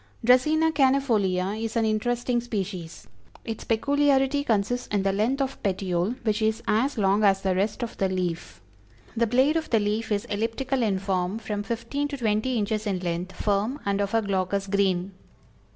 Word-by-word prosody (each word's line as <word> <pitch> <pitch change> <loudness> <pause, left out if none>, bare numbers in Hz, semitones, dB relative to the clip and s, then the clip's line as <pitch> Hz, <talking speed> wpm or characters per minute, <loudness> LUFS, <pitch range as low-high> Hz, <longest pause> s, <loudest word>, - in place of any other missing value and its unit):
Dracæna 310 +6 +4
cannæfolia 225 -10 +2
is 225 0 -4
an 230 -1 +2
interesting 240 +3 0
species. 190 -7 -5 0.4
Its 225 -2 -5
peculiarity 280 +3 +2
consists 235 +1 0
in 205 -2 0
the 195 0 +1
length 235 +8 0
of 270 0 -6
petiole, 190 +2 -1
which 215 -1 0
is 220 0 0
as 235 +6 +1
long 200 +1 +2
as 195 -1 +3
the 190 -1 +2
rest 200 +6 -1
of 235 - -5
the 195 - +1
leaf. 175 - -3 0.5
The 235 0 +2
blade 260 +7 +3
of 320 - -3
the 225 - +3
leaf 215 +2 -1
is 205 -1 0
elliptical 230 +5 -2
in 205 -4 +1
form, 190 0 -1
from 210 -2 -4
fifteen 235 +7 -3
to 285 -1 -5
twenty 230 +1 0
inches 215 0 -1
in 195 -2 0
length, 175 +1 -3
firm, 210 +7 0
and 200 0 0
of 200 +2 -1
a 225 - +2
glaucous 195 0 -1
green. 195 -2 0
215 Hz, 175 wpm, -26 LUFS, 195-245 Hz, 0.5 s, Dracæna